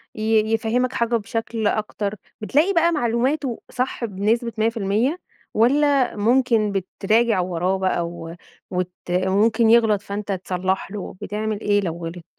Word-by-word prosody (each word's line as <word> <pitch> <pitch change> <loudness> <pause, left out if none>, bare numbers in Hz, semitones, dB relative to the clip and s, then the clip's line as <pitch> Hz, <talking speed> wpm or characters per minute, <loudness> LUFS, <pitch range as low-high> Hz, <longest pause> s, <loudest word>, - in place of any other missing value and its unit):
ي 220 0 +1
يفهّمك 240 +3 0
حاجة 235 -1 +1
بشكل 225 0 -2
أكتر، 210 -1 -2 0.3
بتلاقي 295 - +2
بقى 340 -1 +3
معلوماته 255 -1 0
صح 255 -1 -2
بنسبة 220 +3 -1
100% 225 - 0 0.3
والّا 275 +3 +3
ممكن 230 -1 +2
بتراجع 200 +3 +1
وراه 180 +1 0
بقى 185 -2 0
و 165 -1 -8 0.4
وت 180 -1 -2 0.2
وممكن 200 +6 +2
يغلط 225 -3 +4
فأنت 205 0 -5
تصلّح 190 0 -2
له، 205 -3 -6
بتعمل 215 +1 -3
إيه 205 0 +2
لو 170 -3 -3
غلط؟ 170 +1 -7
215 Hz, 130 wpm, -22 LUFS, 195-235 Hz, 0.4 s, يغلط